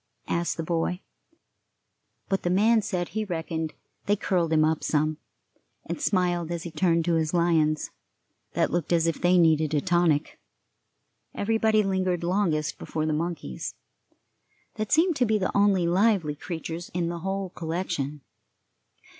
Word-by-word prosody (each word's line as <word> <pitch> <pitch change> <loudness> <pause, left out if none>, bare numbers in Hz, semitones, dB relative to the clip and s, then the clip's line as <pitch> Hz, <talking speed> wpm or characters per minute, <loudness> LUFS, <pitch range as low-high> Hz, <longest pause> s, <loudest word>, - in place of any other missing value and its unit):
asked 170 0 -1
the 165 - -2
boy; 170 +2 -1 1.3
but 195 - 0
the 175 - -1
man 215 +5 +4
said 180 -3 -2
he 220 0 -2
reckoned 160 -4 -3 0.3
they 205 - +4
curled 180 -5 0
him 155 -1 +4
up 160 0 0
some, 155 0 +1 0.7
and - - -5
smiled 175 - +1
as 170 -1 -3
he 170 - -6
turned 165 0 +2
to 175 - +1
his 160 +1 0
lions, 160 -3 +2 0.6
that - - +1
looked 175 -1 -1
as 165 -1 +3
if 165 -2 -1
they 180 +1 +4
needed 160 -2 +3
a - - +4
tonic. 170 -3 +1 1.0
Everybody 220 0 +2
lingered 185 -3 0
longest 170 -4 0
before 155 -1 -3
the 155 - 0
monkeys, 155 - -4 1.0
that 215 -1 -4
seemed 335 +1 +4
to 250 - +3
be 215 0 +2
the 185 - -2
only 200 -3 +4
lively 185 -3 +2
creatures 165 +2 -6
in 170 -1 0
the 170 0 -4
whole 190 +1 -3
collection.... 160 -4 -3
175 Hz, 150 wpm, -26 LUFS, 160-190 Hz, 1.3 s, man